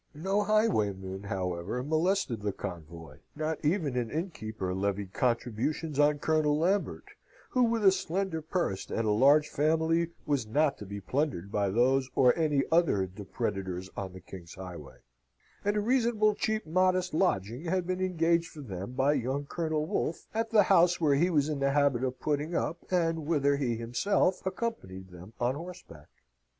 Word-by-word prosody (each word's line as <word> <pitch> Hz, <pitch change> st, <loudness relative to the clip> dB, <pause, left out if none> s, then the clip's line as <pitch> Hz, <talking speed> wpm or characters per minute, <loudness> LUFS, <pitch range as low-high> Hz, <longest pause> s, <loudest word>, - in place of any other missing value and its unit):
No 190 Hz, +7 st, 0 dB
highwayman, 105 Hz, -, 0 dB
however, 95 Hz, +4 st, -3 dB
molested 155 Hz, -, 0 dB
the 105 Hz, 0 st, -1 dB
convoy; 85 Hz, -3 st, -8 dB, 0.2 s
not 155 Hz, +1 st, -3 dB
even 150 Hz, -4 st, 0 dB
an 120 Hz, -2 st, -1 dB
innkeeper 110 Hz, -, -4 dB
levied 100 Hz, 0 st, -2 dB
contributions 125 Hz, +5 st, -1 dB
on 145 Hz, 0 st, +4 dB
Colonel 150 Hz, 0 st, +1 dB
Lambert, 190 Hz, +6 st, 0 dB, 0.4 s
who, 255 Hz, -, +2 dB
with 230 Hz, -3 st, +2 dB
a 190 Hz, -, +9 dB
slender 190 Hz, -2 st, -2 dB
purse 160 Hz, -, -2 dB
and 115 Hz, -, -1 dB
a 105 Hz, -, +2 dB
large 140 Hz, +7 st, +5 dB
family, 160 Hz, +2 st, +1 dB, 0.2 s
was 140 Hz, -7 st, 0 dB
not 145 Hz, +5 st, +1 dB
to 105 Hz, -, -8 dB
be 100 Hz, +1 st, -6 dB
plundered 100 Hz, -, -2 dB
by 100 Hz, -2 st, +1 dB
those 130 Hz, +5 st, +2 dB
or 125 Hz, -2 st, +5 dB
any 150 Hz, -4 st, +2 dB
other 160 Hz, -, +3 dB
depredators 95 Hz, -1 st, -4 dB
on 95 Hz, -2 st, -5 dB
the 95 Hz, -, -10 dB
king's 85 Hz, -1 st, -11 dB
highway; 85 Hz, -9 st, -10 dB, 0.6 s
and 205 Hz, +1 st, +1 dB
a -, -, +2 dB
reasonable 225 Hz, -2 st, +2 dB
cheap 220 Hz, +1 st, -1 dB
modest 185 Hz, +2 st, +1 dB
lodging 125 Hz, -, 0 dB
had 180 Hz, +1 st, 0 dB
been 185 Hz, +1 st, -2 dB
engaged 170 Hz, -2 st, +1 dB
for 150 Hz, -, -10 dB
them 100 Hz, -2 st, -6 dB
by 135 Hz, +3 st, +2 dB
young 135 Hz, +1 st, -2 dB
Colonel 155 Hz, 0 st, -2 dB
Wolfe, 170 Hz, -2 st, -2 dB
at 225 Hz, +1 st, -1 dB
the 215 Hz, -2 st, +5 dB
house 175 Hz, -1 st, +4 dB
where 155 Hz, -4 st, +3 dB
he 165 Hz, +6 st, +3 dB
was 150 Hz, -4 st, +2 dB
in 150 Hz, -2 st, -2 dB
the 140 Hz, 0 st, +1 dB
habit 140 Hz, -4 st, +2 dB
of 130 Hz, -1 st, -2 dB
putting 150 Hz, +3 st, -1 dB
up, 170 Hz, +1 st, -1 dB
and 165 Hz, -4 st, 0 dB
whither 140 Hz, -3 st, +2 dB
he 125 Hz, -5 st, 0 dB
himself 150 Hz, -, 0 dB
accompanied 140 Hz, -, -4 dB
them 90 Hz, +5 st, -12 dB
on 120 Hz, +1 st, +1 dB
horseback. 155 Hz, -, -10 dB
145 Hz, 165 wpm, -29 LUFS, 105-170 Hz, 0.6 s, a